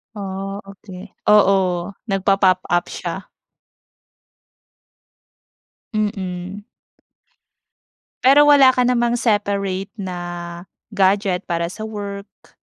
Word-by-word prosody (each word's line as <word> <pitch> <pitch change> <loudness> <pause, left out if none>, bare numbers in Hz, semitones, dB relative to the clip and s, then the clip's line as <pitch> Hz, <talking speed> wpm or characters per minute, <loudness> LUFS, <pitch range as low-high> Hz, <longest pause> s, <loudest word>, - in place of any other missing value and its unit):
Ah, 195 0 -5
okey. 195 0 -11 0.2
Oo, 190 -4 +3 0.2
nagpa-pop 195 -3 +2
up 175 0 +1
siya. - - -5 2.7
Mm. 195 -2 -3 1.6
Pero 280 +3 +6
wala 285 -3 +7
ka 250 -1 +2
namang 240 -1 +1
separate 200 -4 -1
na 185 -3 -5 0.8
gadget 195 -1 +2
para 170 0 0
sa 220 - -10
work? 205 -2 -8
200 Hz, 80 wpm, -20 LUFS, 190-215 Hz, 2.7 s, wala